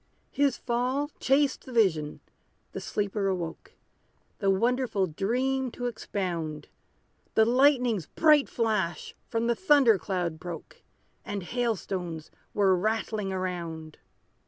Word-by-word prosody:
His 280 -3 +2
fall 255 +5 -1
chased 270 0 +2
the - - -8
vision 170 -11 +1 0.5
the - - -6
sleeper 200 -1 -1
awoke, 175 -4 -4 0.7
The 195 - +1
wonderful 230 0 +2
dream 255 +10 -1
to 245 - -5
expound; 175 -9 -3 0.7
The 220 - +6
lightning's 245 - +3
bright 300 -3 +4
flash 210 -7 -1 0.2
from 230 0 0
the 235 - +3
thunder 275 - +4
cloud 175 -3 -2
broke, 170 -1 -8 0.4
And 200 -2 -4
hail 235 +3 0
stones 175 -5 -5 0.2
were 195 -2 +4
rattling 215 +1 -1
around. 170 -4 -4
210 Hz, 115 wpm, -28 LUFS, 180-250 Hz, 0.7 s, The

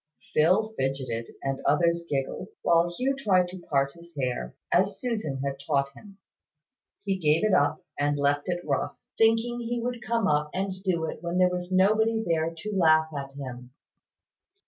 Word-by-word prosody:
Phil 190 +8 +3
fidgeted, 130 -4 -2
and 135 0 -2
others 170 +3 +2
giggled, 135 -1 -2 0.2
while 170 0 +4
Hugh 255 +10 -1
tried 185 -9 +2
to 185 +1 -8
part 140 -5 0
his 170 -1 -16
hair, 125 - -2 0.2
as 195 +2 +2
Susan 210 - -2
had 140 0 -2
taught 140 -2 +1
him. 200 +5 -15 0.9
He 195 -1 0
gave 155 -1 +3
it 215 - +2
up, 145 +2 +2
and 145 0 +1
left 145 +2 +1
it 175 0 -2
rough, 140 -3 -1 0.2
thinking 225 +2 +3
he 240 0 -2
would 240 0 -3
come 230 -2 0
up 150 0 +1
and 190 +1 -1
do 170 -4 0
it 155 - -6
when 170 +1 -2
there 180 0 +4
was 180 0 -4
nobody 220 +4 +3
there 165 -2 +1
to 180 +6 -6
laugh 160 -3 +4
at 140 -1 -5
him. 125 -3 -8
170 Hz, 170 wpm, -27 LUFS, 145-200 Hz, 0.9 s, while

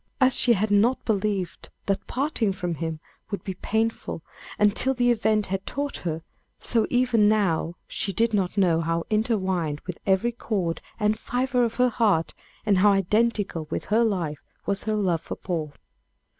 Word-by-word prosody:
As 260 -2 +5
she 240 - +5
had 210 0 0
not 225 +6 +3
believed 200 -4 -1 0.2
that 195 0 -1
parting 255 -6 0
from 180 -2 -3
him 160 0 -4 0.3
would 200 - -4
be 190 - -4
painful 220 -3 -2 0.3
until 210 +6 +2
the 245 0 +3
event 215 -2 +2
had 190 0 -3
taught 285 0 -3
her, 160 -2 -4 0.3
so 230 -2 +1
even 245 -4 +3
now 175 -6 +1
she 200 - -2
did 225 +4 +1
not 195 -1 0
know 170 -4 +3
how 165 0 -1
intertwined 190 -9 0
with 180 -2 -6
every 195 +5 +3
chord 195 -8 -2 0.2
and 215 0 +1
fibre 250 +1 0
of 230 -1 -1
her 250 0 +3
heart 210 -8 +1 0.3
and 200 -3 +3
how 205 +2 +6
identical 200 -4 +1
with - - -3
her 220 +3 +3
life, 175 -9 -1 0.2
was 200 0 -1
her 215 -1 0
love 180 -6 +1
for - - -6
Paul. 160 -5 -3
205 Hz, 170 wpm, -25 LUFS, 180-230 Hz, 0.3 s, how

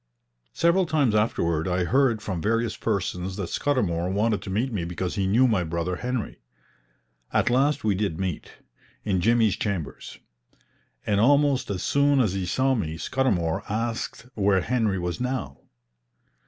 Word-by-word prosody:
Several 170 +2 +3
times 145 -8 +2
afterward 85 -7 +1
I 90 0 0
heard 120 +1 +2
from 95 -6 -3
various 115 +2 0
persons 95 -1 -2
that 95 -4 -4
Scudamour 90 -12 0
wanted 105 +1 +1
to 100 - -8
meet 115 +6 -1
me 95 -5 -2
because 90 +1 -3
he 100 -3 -1
knew 120 +7 +4
my 105 -7 +1
brother 85 +2 -2
Henry. 125 -1 -4 0.9
At - - +2
last 140 +4 +2
we 105 -2 +2
did 95 -4 -2
meet, 95 -4 -4 0.5
in 95 -4 0
Jimmy's 110 -1 +3
chambers; 90 - -4 0.9
and, 100 -1 +1
almost 140 +3 +3
as 95 -3 -3
soon 140 0 +3
as 110 -7 +2
he 95 -2 -2
saw 130 +8 +2
me, 80 -10 -2
Scudamour 90 - 0
asked 115 +1 -3
where 100 -4 +2
Henry 110 -3 0
was 90 +4 -3
now. 125 - -3
105 Hz, 155 wpm, -25 LUFS, 90-125 Hz, 0.9 s, knew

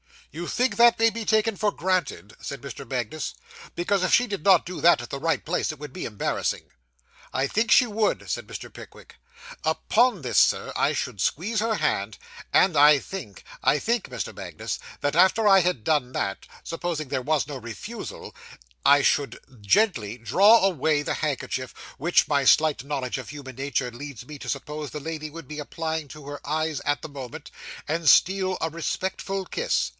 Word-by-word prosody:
'You 170 +3 -5
think 255 +1 0
that 235 0 +6
may 225 0 +4
be 225 0 -5
taken 220 -1 +2
for 210 +1 +1
granted?' 165 - -2
said 140 -3 -6
Mr. 140 0 -9
Magnus; 130 +4 -3 0.4
'because, 195 +3 0
if 185 - +1
she 245 - +5
did 200 -7 -5
not 195 -2 +6
do 180 0 -6
that 175 -7 +5
at 120 - -9
the 140 - -4
right 165 +2 0
place, 175 0 -1
it - - -12
would 145 -1 -8
be - - -6
embarrassing.' 105 -3 -2 0.6
'I 135 +1 +1
think 220 +8 0
she 250 - +7
would,' 215 -2 -1
said - - -3
Mr. - - -8
Pickwick. - - -13 0.5
'Upon 235 -4 +2
this, 125 -5 -2
sir, - - +3
I - - +2
should 100 - -3
squeeze 200 - 0
her 225 +1 +1
hand, 100 - -1 0.4
and 180 -5 +4
I 150 +1 +8
think 140 - -8 0.2
I - - +3
think, 230 +6 0
Mr. 125 -8 -5
Magnus - - -5 0.2
that 145 +2 0
after 205 +4 +5
I 195 -1 +7
had 180 - 0
done 145 -4 +1
that, 95 0 -3 0.2
supposing 165 -4 -4
there 130 - -1
was 150 +2 +1
no 145 -1 -6
refusal, 125 - -8 0.5
I 145 0 +7
should 140 0 +1 0.2
gently 115 - +1
draw 190 - +5
away 155 -5 +1
the - - -2
handkerchief, 135 -3 -3 0.2
which 170 +5 +2
my 140 -2 +2
slight 150 -2 +4
knowledge 135 -3 -3
of 130 -5 -7
human 135 -4 -9
nature 135 -2 -2
leads 130 -1 -9
me 150 +1 -10
to - - -7
suppose 150 +2 -4
the 150 - -6
lady 155 0 -5
would 165 -2 -10
be 150 +1 -7
applying 160 0 -4
to 150 +1 -11
her 145 0 -6
eyes 155 0 -1
at 145 0 0
the - - -7
moment, 140 +2 -9 0.4
and 165 +1 -2
steal 190 0 +4
a 160 - 0
respectful 190 +4 -3
kiss. 475 - -1
155 Hz, 185 wpm, -25 LUFS, 135-190 Hz, 0.6 s, I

